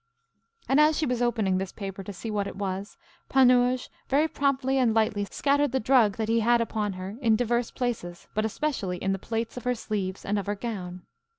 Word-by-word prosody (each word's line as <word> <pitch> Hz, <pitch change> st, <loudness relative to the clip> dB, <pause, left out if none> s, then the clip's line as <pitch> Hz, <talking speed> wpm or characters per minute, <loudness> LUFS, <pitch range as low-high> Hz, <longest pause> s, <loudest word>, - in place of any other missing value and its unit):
And, 270 Hz, +2 st, +3 dB
as 305 Hz, 0 st, +5 dB
she 315 Hz, -, +1 dB
was 250 Hz, -2 st, -1 dB
opening 220 Hz, -6 st, +1 dB
this 190 Hz, -1 st, -4 dB
paper 195 Hz, -2 st, -6 dB
to 205 Hz, -, -7 dB
see 215 Hz, +4 st, -6 dB
what 205 Hz, -1 st, -1 dB
it -, -, -7 dB
was, 195 Hz, 0 st, -4 dB, 0.3 s
Panurge 250 Hz, -1 st, +4 dB, 0.2 s
very 290 Hz, +4 st, +3 dB
promptly 270 Hz, -2 st, +1 dB
and 235 Hz, -4 st, +3 dB
lightly 215 Hz, -2 st, +1 dB
scattered 285 Hz, +7 st, +1 dB
the 265 Hz, -, +2 dB
drug 225 Hz, -4 st, +3 dB
that 220 Hz, -1 st, -1 dB
he 230 Hz, +1 st, +2 dB
had 235 Hz, +2 st, +4 dB
upon 215 Hz, -3 st, -1 dB
her 185 Hz, +3 st, -7 dB
in 225 Hz, -3 st, +4 dB
divers 240 Hz, 0 st, 0 dB
places, 210 Hz, -9 st, -4 dB
but 215 Hz, -, 0 dB
especially 220 Hz, -6 st, -2 dB
in 195 Hz, -, -1 dB
the 195 Hz, -, -3 dB
plaits 225 Hz, +3 st, -3 dB
of 250 Hz, -, -6 dB
her 250 Hz, 0 st, +1 dB
sleeves 195 Hz, -4 st, -4 dB
and 205 Hz, +1 st, 0 dB
of 200 Hz, -, -6 dB
her 205 Hz, -, 0 dB
gown. 185 Hz, -5 st, -5 dB
225 Hz, 210 wpm, -27 LUFS, 200-250 Hz, 0.3 s, as